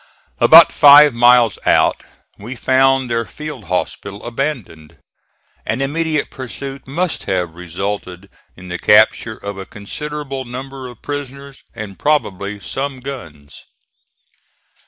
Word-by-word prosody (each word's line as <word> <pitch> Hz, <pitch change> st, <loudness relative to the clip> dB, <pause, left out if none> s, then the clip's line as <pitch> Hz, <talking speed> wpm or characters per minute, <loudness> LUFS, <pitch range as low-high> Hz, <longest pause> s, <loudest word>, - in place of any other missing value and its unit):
About -, -, +8 dB
five 145 Hz, -1 st, +8 dB
miles 120 Hz, -3 st, +4 dB
out -, -, +2 dB, 0.4 s
we 120 Hz, +6 st, -8 dB
found 130 Hz, +1 st, +2 dB
their 115 Hz, 0 st, 0 dB
field 135 Hz, +1 st, -9 dB
hospital 95 Hz, +3 st, -4 dB
abandoned. 120 Hz, -, -5 dB, 0.7 s
An 115 Hz, -, -2 dB
immediate 150 Hz, +2 st, -1 dB
pursuit 135 Hz, +1 st, -8 dB
must 170 Hz, +5 st, -3 dB
have 90 Hz, -3 st, -2 dB
resulted 90 Hz, +2 st, -6 dB, 0.3 s
in 90 Hz, 0 st, -12 dB
the 90 Hz, 0 st, -5 dB
capture 110 Hz, +1 st, +3 dB
of 100 Hz, -1 st, -7 dB
a 95 Hz, -, -7 dB
considerable 140 Hz, +5 st, -6 dB
number 130 Hz, +1 st, -8 dB
of 120 Hz, -3 st, -14 dB
prisoners 140 Hz, -1 st, -7 dB
and 105 Hz, -3 st, -8 dB
probably 105 Hz, -9 st, -1 dB
some 135 Hz, +8 st, -5 dB
guns. 80 Hz, -, -10 dB
125 Hz, 115 wpm, -17 LUFS, 100-140 Hz, 0.7 s, About